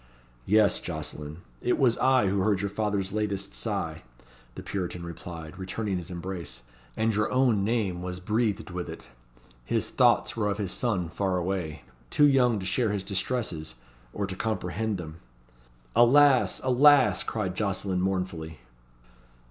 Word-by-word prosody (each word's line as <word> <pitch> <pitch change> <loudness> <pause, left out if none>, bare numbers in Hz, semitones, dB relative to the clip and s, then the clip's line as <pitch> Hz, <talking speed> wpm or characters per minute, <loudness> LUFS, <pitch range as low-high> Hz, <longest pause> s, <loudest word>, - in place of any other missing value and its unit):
"Yes, 105 +1 +4
Jocelyn, 75 -1 -6 0.2
it 125 - +1
was 120 -4 +3
I 130 -4 +4
who 100 +1 +1
heard 100 -1 +2
your 100 -1 -2
father's 100 -2 -1
latest 100 - -2
sigh," - - -3 0.5
the - - -7
Puritan 90 -3 -4
replied, 85 0 -8
returning 95 0 -2
his 85 - -9
embrace, 90 -6 -6 0.3
"and 110 0 +1
your 105 +1 0
own 125 -6 +3
name 100 -5 0
was 90 0 -5
breathed 105 0 -1
with 90 0 -4
it. - - -9 0.5
His - - -1
thoughts - - +3
were 105 -2 0
of 100 - -1
his 100 -3 -3
son 105 -8 -1
far 95 +1 -1
away 90 -3 -3 0.3
too 145 - +4
young 125 -5 +4
to 95 - -6
share 110 +3 +1
his 100 -2 -2
distresses, 95 - -2 0.4
or 100 - -2
to 95 -1 -5
comprehend 110 0 -2
them." 80 -1 -8 0.8
"Alas! 135 +2 +5
alas!" 130 -5 +5
cried 95 -5 -3
Jocelyn 95 -2 -1
mournfully. 90 -4 -2
100 Hz, 150 wpm, -27 LUFS, 90-110 Hz, 0.8 s, Alas